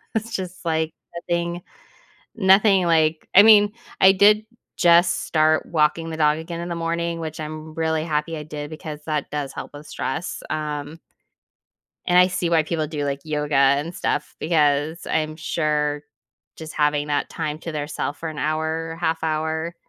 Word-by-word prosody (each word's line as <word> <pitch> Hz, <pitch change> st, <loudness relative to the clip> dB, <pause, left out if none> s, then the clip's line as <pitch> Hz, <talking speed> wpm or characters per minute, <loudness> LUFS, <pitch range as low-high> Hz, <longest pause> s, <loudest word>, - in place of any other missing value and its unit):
It's 225 Hz, +1 st, -2 dB
just, 185 Hz, -1 st, -6 dB
like, 160 Hz, -1 st, 0 dB, 0.2 s
nothing 170 Hz, 0 st, -2 dB, 0.7 s
nothing 195 Hz, -2 st, +4 dB
like 160 Hz, -1 st, +2 dB
I 200 Hz, -, +10 dB
mean, 210 Hz, -1 st, +6 dB, 0.3 s
I 190 Hz, -, +8 dB
did 210 Hz, +2 st, +5 dB, 0.3 s
just 175 Hz, +1 st, +4 dB
start 155 Hz, 0 st, +2 dB
walking 165 Hz, 0 st, +1 dB
the 160 Hz, -, -5 dB
dog 150 Hz, 0 st, +3 dB
again 170 Hz, +1 st, -6 dB
in 175 Hz, -, -5 dB
the 170 Hz, -, -3 dB
morning, 170 Hz, 0 st, -2 dB
which 160 Hz, -1 st, -6 dB
I'm 155 Hz, 0 st, -6 dB
r 155 Hz, -, -12 dB
really 160 Hz, -1 st, -1 dB
happy 160 Hz, 0 st, -2 dB
I 150 Hz, -, -6 dB
did 150 Hz, -1 st, -7 dB
because 155 Hz, -2 st, -7 dB
that 150 Hz, -3 st, -2 dB
does 145 Hz, -2 st, -4 dB
help -, -, -7 dB
with 145 Hz, +1 st, -11 dB
stress, 135 Hz, +7 st, -4 dB
um. 150 Hz, +1 st, -4 dB, 1.1 s
And 180 Hz, 0 st, +4 dB
I 180 Hz, -, +6 dB
see 180 Hz, -2 st, -2 dB
why 165 Hz, -2 st, +4 dB
people 155 Hz, -1 st, -2 dB
do, 145 Hz, -1 st, -4 dB
like, 140 Hz, 0 st, -2 dB
yoga 150 Hz, -1 st, -2 dB
and 140 Hz, +5 st, +3 dB
stuff 150 Hz, -, -2 dB
because 155 Hz, 0 st, +1 dB
I'm 155 Hz, 0 st, -1 dB
sure 150 Hz, -2 st, -1 dB, 0.5 s
just 160 Hz, -1 st, -8 dB
having 150 Hz, 0 st, +1 dB
that 145 Hz, -1 st, 0 dB
time 155 Hz, -3 st, -4 dB
to 165 Hz, -, -6 dB
their 150 Hz, -1 st, -3 dB
self 145 Hz, -1 st, -4 dB
for 165 Hz, -, -5 dB
an 155 Hz, -1 st, -7 dB
hour, 160 Hz, +1 st, -2 dB
half 165 Hz, -1 st, -1 dB
hour 160 Hz, +2 st, -2 dB
160 Hz, 175 wpm, -22 LUFS, 150-170 Hz, 1.1 s, I